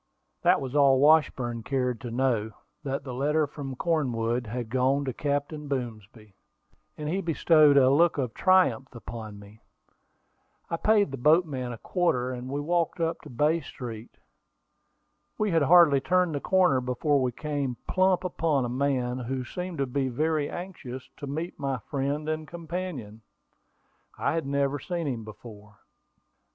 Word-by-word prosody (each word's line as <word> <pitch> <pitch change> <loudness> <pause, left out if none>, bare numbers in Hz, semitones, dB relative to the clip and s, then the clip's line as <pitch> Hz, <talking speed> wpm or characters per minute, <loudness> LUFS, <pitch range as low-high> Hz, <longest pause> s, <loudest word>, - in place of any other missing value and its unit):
That - - +4
was 130 -1 -5
all 140 -2 +5
that - - +1
Washburn 130 -6 +3
cared 125 -1 -1
to 120 - -5
know 115 -3 0 0.3
that 135 -1 -3
the 130 -2 -6
letter 150 +4 +1
from 140 -2 -7
Cornwood 125 -7 -1
had 120 +1 -4
gone 130 +3 +1
to 130 - -2
Captain 145 +2 -2
Boomsby; 110 -5 -6 0.6
and 150 - -5
he 185 +5 -1
bestowed 155 -3 +4
a 130 -2 +6
look 165 +4 +4
of 125 -5 -2
triumph 140 -10 +2
upon 115 -3 -8
me. 105 +2 -15 1.1
I 165 - 0
paid 210 -3 +3
the 135 - -6
boatman 150 -4 +2
a 120 - -6
quarter, 130 - 0
and 125 0 -6
we 140 +2 -2
walked 170 +3 0
up 165 0 -1
to - - -12
Bay 150 +7 +1
Street. 115 -6 -9 1.2
We 215 -2 0
had 165 -1 +3
hardly 150 -2 +6
turned 180 +1 +2
the 145 - -1
corner 180 -9 +3
before 135 +3 +1
we 125 -1 0
came 140 -2 -3
plump 185 -1 +2
upon 160 -7 0
a - - -3
man 130 -1 -1
who 130 +1 -3
seemed 180 +4 -5
to 140 - 0
be 135 +1 -1
very 150 +3 0
anxious 145 -9 -7
to 145 - -7
meet 160 +5 -5
my 135 -2 -1
friend 140 +5 -3
and 155 0 -3
companion. 165 - -6 1.0
I - - 0
had 165 -4 -2
never 140 0 0
seen 170 +1 -3
him 125 -6 -3
before. 105 -1 -12
140 Hz, 160 wpm, -27 LUFS, 125-160 Hz, 1.2 s, a